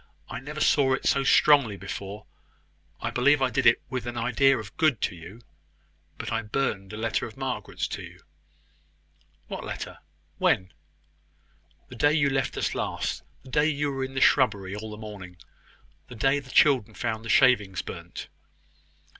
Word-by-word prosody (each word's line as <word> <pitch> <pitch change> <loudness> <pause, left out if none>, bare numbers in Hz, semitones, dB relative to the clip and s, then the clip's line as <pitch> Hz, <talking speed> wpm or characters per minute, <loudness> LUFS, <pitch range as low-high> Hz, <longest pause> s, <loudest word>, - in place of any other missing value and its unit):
I - - -4
never 150 +3 -7
saw 135 -2 +4
it - - -8
so 135 - +3
strongly 135 -6 +5
before; 100 +1 -7 0.8
I - - -2
believe 145 +4 +4
I 130 -1 +1
did 115 - +2
it 115 - +6
with 130 -2 -4
an 120 0 -4
idea 125 +3 +3
of 105 -3 -8
good 155 -8 +2
to - - -1
you; 90 +7 -12 0.8
but - - -5
I 115 0 0
burned 105 -4 -2
a 105 - -7
letter 115 0 -1
of - - -14
Margaret's - - -3
to - - -5
you." - - -11 1.3
"What - - -6
letter? - - -6 0.4
When?" 90 -2 +1 1.2
"The 125 - -10
day 145 +5 +3
you 145 -3 +2
left 135 0 -1
us - - -1
last - - -3 0.2
the 130 - -13
day 150 +3 +3
you 145 -1 0
were 135 -1 -3
in 135 0 -6
the 130 - -1
shrubbery 100 -8 +3
all 110 +1 -6
the 105 - -8
morning 100 -5 -9 0.7
the 125 - -10
day 135 +6 +2
the 135 -2 -14
children 125 -7 +4
found 110 -2 -3
the 115 - -7
shavings 105 -9 +4
burnt." 85 0 -8
120 Hz, 170 wpm, -26 LUFS, 105-135 Hz, 1.3 s, it